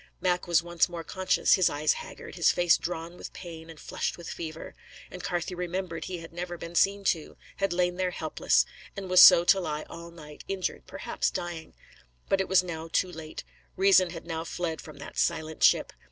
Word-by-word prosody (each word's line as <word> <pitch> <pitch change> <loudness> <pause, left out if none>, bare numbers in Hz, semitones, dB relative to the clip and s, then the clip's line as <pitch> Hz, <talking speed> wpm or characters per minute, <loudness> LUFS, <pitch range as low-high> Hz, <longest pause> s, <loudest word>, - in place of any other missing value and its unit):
Mac 180 -1 0
was 170 -1 +3
once 175 0 +1
more 170 -1 -6
conscious, 185 +2 +2
his 185 -3 +4
eyes 150 +1 +1
haggard, 480 - -10
his - - +3
face 175 -3 +4
drawn 170 0 -5
with - - -9
pain 165 -2 -9
and 160 -2 -11
flushed - - -3
with 170 - -10
fever; 160 -1 -7 0.4
and 180 - -8
Carthew 175 +1 -2
remembered 180 -1 -4
he 185 - -5
had 165 0 -11
never 175 0 -5
been 170 0 -8
seen 200 +3 +2
to, 165 -5 -1 0.2
had 195 -1 0
lain 180 0 0
there 185 -1 0
helpless, 155 - +1 0.3
and 190 -2 -5
was 185 - +8
so 170 - +10
to 195 - +5
lie 155 -4 -3
all 170 0 -9
night, 150 -3 -12
injured, 195 -2 -3
perhaps - - -2
dying. 170 -2 -6 0.5
But 195 - +3
it 190 - -2
was 185 -1 +5
now 165 -2 -6
too 185 +2 +1
late; 160 -2 -8 0.3
reason 190 -1 +5
had 165 -1 -8
now 165 -1 -4
fled 165 -1 -4
from 155 -2 -12
that 140 - -7
silent 160 0 -1
ship. - - +4
175 Hz, 200 wpm, -28 LUFS, 160-180 Hz, 0.5 s, so